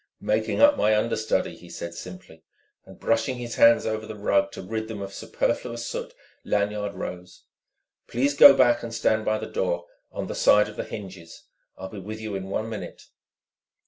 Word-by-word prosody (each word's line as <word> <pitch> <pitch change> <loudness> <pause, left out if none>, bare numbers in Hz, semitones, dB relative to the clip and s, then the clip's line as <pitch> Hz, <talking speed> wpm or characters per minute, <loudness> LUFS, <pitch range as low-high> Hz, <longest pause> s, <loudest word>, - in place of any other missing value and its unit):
"Making 110 +1 0
up 290 0 +7
my 110 0 +3
understudy," 110 0 -1
he - - -15
said 85 0 -6
simply. 90 -2 -11 0.4
And - - -14
brushing 115 +3 0
his 120 -1 -6
hands 115 0 +6
over 110 0 -3
the 110 - -7
rug 100 -1 +1
to - - -7
rid 110 +3 -4
them 110 -2 -6
of 100 0 -6
superfluous 120 +3 -2
soot, - - -6 0.3
Lanyard 105 0 -1
rose. 90 0 -8 0.6
"Please 135 +4 0
go 140 -1 +9
back 120 -2 +4
and 115 -1 -6
stand 110 -1 +1
by 110 - +1
the - - -5
door 85 -2 -2 0.3
on - - -4
the - - -5
side 105 0 +4
of 105 - -10
the - - -4
hinges. 95 -5 -9 0.3
I'll 95 0 -7
be 105 - -8
with 110 +3 -7
you 110 -1 -5
in 95 0 -5
one 110 +3 -2
minute." 110 -1 -8
110 Hz, 185 wpm, -25 LUFS, 95-115 Hz, 0.6 s, go